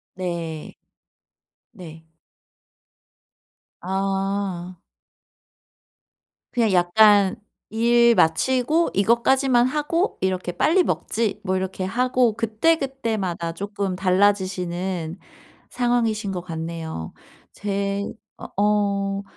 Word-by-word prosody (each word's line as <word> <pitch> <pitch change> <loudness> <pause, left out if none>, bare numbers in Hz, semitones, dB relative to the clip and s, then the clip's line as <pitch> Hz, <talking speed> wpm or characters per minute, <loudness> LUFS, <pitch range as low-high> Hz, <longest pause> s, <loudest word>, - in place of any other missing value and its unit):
네. 170 -4 -5 1.0
네. 165 -6 -12 1.8
아. 195 -1 -2 1.8
그냥 230 -4 +2
약간 195 +2 +5 0.3
'일 235 +1 +4
마치고 260 - +2
이것까지만 240 +4 +3
하고 305 +7 -1
이렇게 185 -1 -1
빨리 340 - +3
먹지.' 225 - -2
뭐 190 -1 -1
이렇게 190 0 -4
하고 245 +3 +1
그때그때마다 225 - -1
조금 200 +1 -3
달라지시는 185 -2 0 0.5
상황이신 230 -4 0
것 180 - -4
같네요. 160 - -6 0.4
제 200 0 -2 0.3
어 - - -8 0.2
어 200 -1 +1
200 Hz, 170 characters per minute, -23 LUFS, 180-235 Hz, 1.8 s, 약간